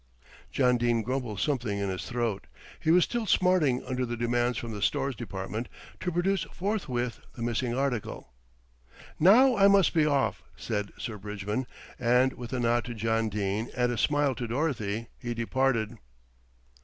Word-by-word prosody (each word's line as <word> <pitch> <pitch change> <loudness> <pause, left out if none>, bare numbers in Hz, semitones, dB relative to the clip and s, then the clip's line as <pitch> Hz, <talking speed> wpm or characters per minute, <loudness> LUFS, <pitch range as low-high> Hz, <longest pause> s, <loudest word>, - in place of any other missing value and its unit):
John 125 -2 +3
Dene 120 -1 +1
grumbled 125 -4 -3
something 120 -7 -1
in 100 -1 -1
his 95 -1 -4
throat. 120 -5 -2 0.3
He - - -1
was 175 +2 +6
still 235 -3 -2
smarting 180 -10 +3
under 130 0 -2
the 120 -1 -3
demands 120 0 +1
from 115 +1 -4
the 105 -2 -6
Stores 135 +5 0
Department 110 +1 -5 0.3
to 180 - -2
produce 185 +3 +1
forthwith 130 - -2 0.2
the 115 - -5
missing 120 +1 -1
article. 125 - -3 0.9
"Now 240 - +7
I 200 -1 +6
must 200 -3 +5
be 155 -3 +3
off," 140 -2 +1
said 105 -3 -3
Sir 110 -3 -5
Bridgman, 105 +4 -3 0.3
and 125 +2 +3
with 120 -1 -8
a 130 - -1
nod 120 0 +2
to 120 -1 -6
John 115 0 0
Dene 105 +2 -2
and 125 0 +2
a - - -1
smile 145 -2 +2
to 120 -1 -4
Dorothy 115 -4 -2
he 120 -2 -4
departed. 115 -2 0
120 Hz, 165 wpm, -28 LUFS, 115-140 Hz, 0.9 s, Now